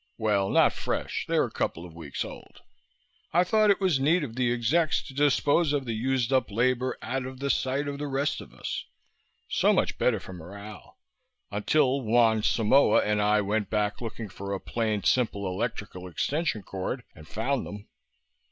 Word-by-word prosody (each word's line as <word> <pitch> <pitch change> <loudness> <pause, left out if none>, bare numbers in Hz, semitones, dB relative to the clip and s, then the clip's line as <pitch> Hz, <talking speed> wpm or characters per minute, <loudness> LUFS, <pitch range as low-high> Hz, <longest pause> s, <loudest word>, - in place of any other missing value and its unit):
Well, 105 -3 +1
not - - +4
fresh. - - -3
They're - - +2
a - - -7
couple 85 - -2
of 85 - -11
weeks 80 -4 -5
old. - - -11 0.7
I 175 +2 +5
thought 215 +3 +3
it 200 - +4
was 185 -8 +2
neat 155 +5 +3
of 115 -5 -6
the 125 -1 +1
execs 135 +8 +1
to - - -10
dispose 145 +2 +3
of 140 -2 0
the 115 - -2
used 130 +2 0
up 130 -2 +2
labor 125 +4 +1
out 130 +1 -2
of 130 0 -9
sight 135 +3 -1
of 140 0 -4
the 145 - -3
rest 140 +1 -1
of - - -12
us. - - -5 0.6
So - - +3
much - - 0
better - - +2
for 95 - -10
morale... 100 +5 -10 0.5
until 135 +6 +2
Juan 115 -1 +3
Simoa 110 +2 +4
and 105 0 +1
I 105 +1 +3
went 105 +1 -1
back 105 0 -1
looking 115 -1 -5
for 100 +1 -6
a 95 - -2
plain, 110 -2 -2
simple 110 -5 +1
electrical 95 -1 -4
extension 140 - -1
cord 95 +7 -4
and 75 -2 -14
found 130 - -2
them." 105 0 -9
115 Hz, 180 wpm, -27 LUFS, 105-135 Hz, 0.7 s, I